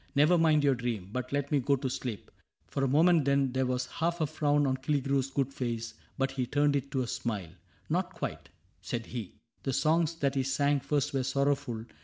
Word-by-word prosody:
Never 150 +5 +5
mind 160 -3 +4
your 140 -1 +4
dream. 120 -6 -3
But 125 0 -3
let 145 0 -1
me 145 - +4
go 140 +2 +2
to 135 0 -3
sleep." 125 -4 -5 0.2
— - - -44
For 135 - -1
a - - +3
moment 160 +4 +5
then 140 -1 +2
There 130 0 0
was 125 0 0
half 170 +5 -2
a 155 - +2
frown 145 -1 +1
on 130 -1 +1
Killigrew's 135 -1 0
good 135 0 -1
face. 115 -3 -3 0.2
But 135 -1 0
he 130 -2 -2
turned 145 +1 +2
it 140 0 -1
to 130 -2 +1
a - - -5
smile. 105 -9 -3 0.2
— - - -33
" - - -35
Not - - 0
quite," - - -5 0.3
said 115 -1 -4
he; 115 -6 -6
" - - -45
The 135 - -2
songs 165 +3 +2
that 140 -4 0
he 135 - +1
sang 140 +2 +1
first 140 0 -1
were 135 - +1
sorrowful. 135 -3 0
135 Hz, 230 wpm, -30 LUFS, 125-145 Hz, 0.3 s, Never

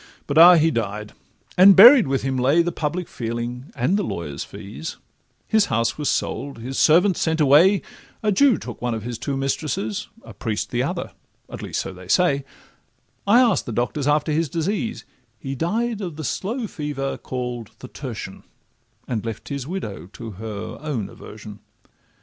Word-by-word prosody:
But, 145 +2 +2
ah! 175 +2 +10
he 160 0 +3
died; 105 -3 -3 0.4
and 190 +2 +8
buried 235 - +9
with 135 -1 -1
him 135 -1 -1
lay 135 +7 +3
The 175 - -1
public 170 +2 -3
feeling 120 +2 -5
and 155 +12 +1
the 205 - 0
lawyers' 75 - -4
fees: 105 +11 -8 0.5
His 220 -2 +3
house 115 - 0
was 150 -1 -2
sold, 140 -3 -2
his 125 +4 -5
servants 180 +4 +4
sent 160 0 0
away, 155 +8 +5 0.4
A 210 - +2
Jew 245 +3 +4
took 120 - -9
one 120 -1 -1
of 110 - -6
his 120 0 -5
two 140 -1 -3
mistresses, 160 - -2 0.2
A - - -11
priest 110 -3 -3
the - - 0
other—at - - -7
least - - -3
so 95 - -6
they 90 0 -12
say: 140 - +2 0.8
I 235 +5 +6
ask'd 230 -7 +2
the - - -3
doctors 125 +5 -1
after 150 +1 +2
his 160 0 0
disease— 200 - -2 0.3
He 135 +5 -6
died 215 - -1
of 175 -5 -5
the 155 - -6
slow 225 - -3
fever 145 -7 -4
call'd 125 -3 -5
the 130 - -10
tertian, 115 -8 -7 0.7
And 115 -4 -2
left 115 -2 -6
his 140 -2 -4
widow 105 - -5
to 115 -2 -8
her 105 +1 -7
own 140 -10 -3
aversion. 105 -1 -11
140 Hz, 175 wpm, -22 LUFS, 115-180 Hz, 0.8 s, ah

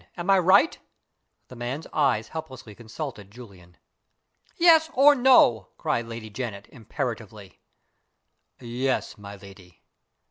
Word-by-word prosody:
Am 175 +3 -1
I 195 - +5
right?" 190 - +3 0.7
The 125 - -12
man's 125 +6 -6
eyes 135 -7 0
helplessly 130 -9 -9
consulted 115 -1 -9
Julian. 100 -6 -16 0.8
"Yes, 325 -2 +5
or 285 +3 +6
no?" 245 - +4
cried 115 -1 -2
Lady 115 -2 -9
Janet, 105 -3 -7
imperatively. 110 -5 -7 1.0
"Yes, 125 +2 -3
my 100 0 -10
lady." 95 -3 -17
120 Hz, 110 wpm, -24 LUFS, 105-160 Hz, 1.0 s, or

